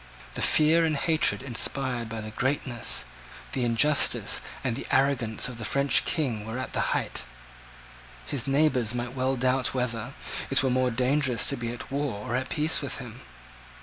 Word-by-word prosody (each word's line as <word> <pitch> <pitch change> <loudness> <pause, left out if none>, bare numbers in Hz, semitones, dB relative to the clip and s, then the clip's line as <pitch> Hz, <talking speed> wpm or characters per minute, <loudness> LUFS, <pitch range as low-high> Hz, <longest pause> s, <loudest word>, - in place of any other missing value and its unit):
The - - -5
fear 160 +2 +4
and 160 -2 +1
hatred 155 0 +2
inspired 125 -1 -1
by 110 0 -5
the 110 0 -7
greatness, 130 0 0 0.5
the 130 - -1
injustice, 120 +5 +3 0.2
and 125 -4 -1
the 135 - -6
arrogance 130 -6 +2
of 125 -2 -8
the - - -5
French 140 +5 +3
King 125 -10 -1
were 110 +3 -5
at 130 - -5
the - - 0
height. - - -3 1.0
His 140 -2 -3
neighbours 135 -5 +2
might 120 0 -3
well 130 0 0
doubt 130 +1 +1
whether 120 -3 -2 0.3
it - - +3
were 130 - +2
more 130 0 +2
dangerous 125 0 +1
to 140 - +2
be 120 -2 -4
at 120 +1 -9
war 140 -7 -3
or 120 - 0
at 130 +1 -2
peace 155 +1 +2
with - - -4
him. - - -9
130 Hz, 175 wpm, -27 LUFS, 120-140 Hz, 1.0 s, fear